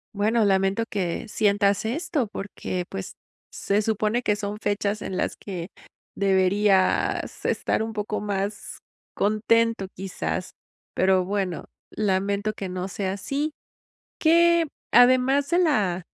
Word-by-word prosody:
Bueno, 215 +2 +2
lamento 195 +2 +2
que 185 0 -2
sientas 205 0 +2
esto 285 -1 -1
porque, 195 -3 -5
pues, 95 - -6 0.3
se 205 +2 0
supone 220 +3 0
que 210 - +2
son 205 0 -4
fechas 205 0 -1
en 185 - -4
las - - -1
que, 180 -2 -6 0.5
deberías 195 0 +2
estar - - 0
un 220 0 -3
poco 210 0 -3
más, 205 0 -4 0.3
contento 215 0 +1
quizás. 185 -1 -4 0.4
Pero, 185 0 +3
bueno, 190 -2 -2 0.2
lamento 200 +1 0
que 195 -2 -5
no 185 +1 -4
sea 190 0 -2
así. 285 +9 -3 0.7
¿Qué? 340 0 +4 0.3
Además 255 +3 +5
de 345 - +2
la 200 - +1
205 Hz, 120 wpm, -25 LUFS, 190-230 Hz, 0.7 s, Además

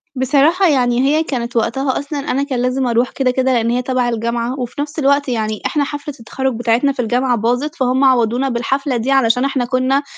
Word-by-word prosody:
بصراحة 290 +8 +3
يعني 245 -4 +2
هي 300 +4 +2
كانت 240 -5 -4
وقتها 260 +4 0
أصلًا 285 +1 -5
أنا 280 -1 -1
كان 270 -3 -3
لازم 255 +1 0
أرُوح 240 +1 +1
كده 260 -2 0
كده، 260 +1 +1
لأن 230 -1 +1
هي 245 +1 0
تبع 250 -1 0
الجامعة، 235 +2 -2
وفي 250 +3 -4
نفْس 295 +2 -5
الوقت 280 0 +2
يعني 215 -3 -2
احنا 295 - 0
حفلة 290 +1 -5
التخرُّج 265 +3 -3
بتاعتنا 240 +4 +2
في 265 -2 -3
الجامعة 245 +2 +1
باظت، 245 +7 -1
فهُم 260 -1 +1
عوّضونا 255 0 +2
بالحفلة 260 +2 -1
دي 240 +4 -1
علشان 250 -1 +3
احنا 270 -3 -1
كنّا 255 +3 +1
255 Hz, 200 wpm, -17 LUFS, 240-275 Hz, -, بصراحة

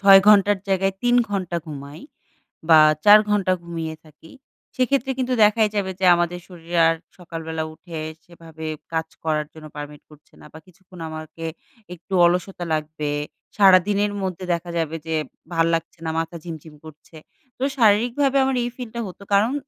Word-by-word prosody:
৬ 195 -1 +8
ঘন্টার 205 -1 +5
জায়গায় 195 0 +1
৩ 245 0 +3 0.2
ঘন্টা 185 -4 -2
ঘুমাই 145 +1 -9 0.7
বা 160 -1 +8 0.3
৪ 210 +1 +9
ঘণ্টা 195 -3 +2
ঘুমিয়ে 165 -2 -5
থাকি, 155 +1 -17 0.4
সেক্ষেত্রে 265 +1 +1
কিন্তু 255 0 -1
দেখাই 215 +1 +3
যাবে 195 -2 0
যে 190 - 0
আমাদের 175 +1 -1
শরীরে 170 -1 -5
আর 165 - +3 0.2
সকালবেলা 160 -2 -5
উঠে 165 -1 -9 0.3
সেভাবে 165 -2 -11 0.3
কাজ 160 0 -1 0.2
করার 155 -1 0
জন্য 155 -1 -11
permit 145 0 -8
করছে 150 0 -20
না - - -13
বা 160 - -10
কিছুক্ষণ 185 0 -18
আমাকে 155 +1 -8 0.5
একটু 180 +3 -8
অলসতা 180 +1 -1
লাগবে। 155 -1 -3 0.5
সারাদিনের 200 +1 +4
মধ্যে 185 -1 -4
দেখা 170 +1 -5
যাবে 165 0 -2
যে 160 - -1 0.4
ভাল্লাগছে 165 0 0
না, - - -1
মাথা 165 +1 -3
ঝিমঝিম 160 -2 -9
করছে। 155 +1 -14 0.4
তো 255 - -8 0.2
শারীরিকভাবে 240 +6 +3
আমার 265 -1 0
এই 240 - -1
feel 245 -3 -7
টা 235 - -3
হতো 185 +2 -12
কারণ 215 +6 +3
175 Hz, 160 wpm, -22 LUFS, 160-205 Hz, 0.7 s, ৪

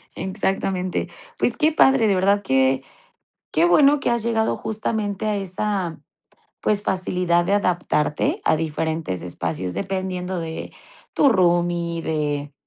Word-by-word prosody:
Exactamente. 190 -1 -2 0.3
Pues, - - 0
qué 315 0 +3
padre, 265 -6 +4
de 200 - +3
verdad 200 +2 +2
que 130 -2 +2 0.7
qué 160 - +3
bueno 280 +11 +5
que 245 - 0
has 235 -2 0
llegado 225 -1 0
justamente 215 -2 -3
a 210 -1 0
esa, 195 -2 -2 0.6
pues, 205 -1 +1
facilidad 180 -2 +1
de 195 - +1
adaptarte 175 -6 0
a - - +3
diferentes 160 - -2
espacios, 90 0 -4
dependiendo 185 -1 -3
de 160 -1 -6 0.4
tu 280 - +4
roomie, 175 -4 +1
de 145 -2 -2
185 Hz, 130 wpm, -22 LUFS, 160-205 Hz, 0.7 s, bueno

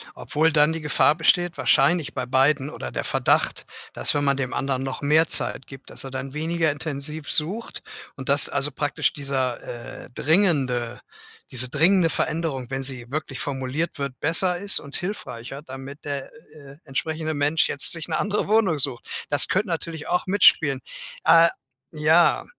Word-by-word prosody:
Obwohl 160 +2 0
dann 150 +1 +4
die 165 - -5
Gefahr 150 0 +2
besteht, 175 +1 +1
wahrscheinlich 170 -4 +2
bei 125 - -4
beiden 135 +2 +1
oder - - -7
der - - -4
Verdacht, - - 0 0.3
dass - - +1
wenn 145 0 0
man 140 -1 +2
dem 130 -2 -4
anderen 135 -1 -2
noch 135 +1 -5
mehr 155 +3 +3
Zeit - - +3
gibt, 135 -1 -13
dass - - -9
er 135 - -7
dann 130 +1 -6
weniger 160 +1 0
intensiv 150 0 -6
sucht 190 +10 -1 0.3
und 130 - -9
dass 140 +1 +5
also, 140 +1 0
praktisch 145 +1 -1
dieser, 130 -4 -4
äh, - - -15
dringende 135 - +1 0.5
diese 130 0 +1
dringende 165 +5 +3
Veränderung, 150 -8 -3
wenn 135 0 -4
sie 125 -3 -4
wirklich 140 -3 -5
formuliert 140 +4 -3
wird, 140 -2 -5
besser 175 +3 +3
ist 200 +2 +5
und 140 -1 -7
hilfreicher, 140 - -6
damit 135 0 -10
der, 140 -2 -5 0.2
äh, 140 -2 -14
entsprechende 155 +2 -3
Mensch 145 +2 +1
jetzt 140 - +4
sich 165 -2 +1
'ne - - -2
andere 205 +1 -1
Wohnung 205 -7 +2
sucht. 130 -3 +2 0.2
Das 145 -2 +5
könnte 195 +4 0
natürlich 165 -2 -4
auch 180 +1 -1
mitspielen. 160 -8 +4 0.4
Äh, 165 0 +6 0.4
ja. 160 +2 +3
145 Hz, 165 wpm, -23 LUFS, 135-165 Hz, 0.5 s, Äh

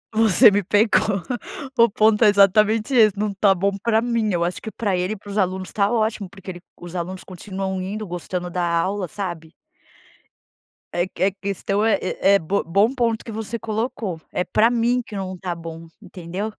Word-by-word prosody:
Você 220 -4 +7
me 205 0 0
pegou, 205 0 +2 0.6
o 235 0 +6
ponto 215 +1 +3
é 215 - +7
exatamente 210 +4 +3
esse, 215 -4 +5
não 210 -1 0
está 195 0 +3
bom 195 +2 0
para 225 -1 +2
mim, 230 -3 0
acho 175 - -4
que 220 - -7
para 205 -4 -1
ele 180 +3 -1
e - - -8
para 205 - -14
os 200 - -5
alunos 185 -1 0
está 200 -1 0
ótimo 215 -4 -1
porque 195 0 -12
ele 175 -1 -7 0.2
os 175 0 -10
alunos 185 +2 -5
continuam 190 +1 -5
indo, 210 +3 -5
gostando 180 0 -4
da 175 0 -2
aula, 180 +3 -1
sabe? 175 -5 -6 1.4
É 175 +1 0
que 185 - -4
é 195 - +3
questão 200 +1 -2
é 220 -3 +3 0.2
é 200 +1 +5
bo 195 +4 -1
bom 200 +9 +2
ponto 235 -4 0
que 225 - -8
você 220 +1 -4
colocou, 220 -5 -3
é 180 - -1
para 220 +4 +3
mim 240 +1 +1
que 210 - -9
não 190 -1 -4
está 180 -1 -4
bom, 165 0 -9
entendeu? 185 +1 -6
200 Hz, 190 wpm, -22 LUFS, 185-215 Hz, 1.4 s, Você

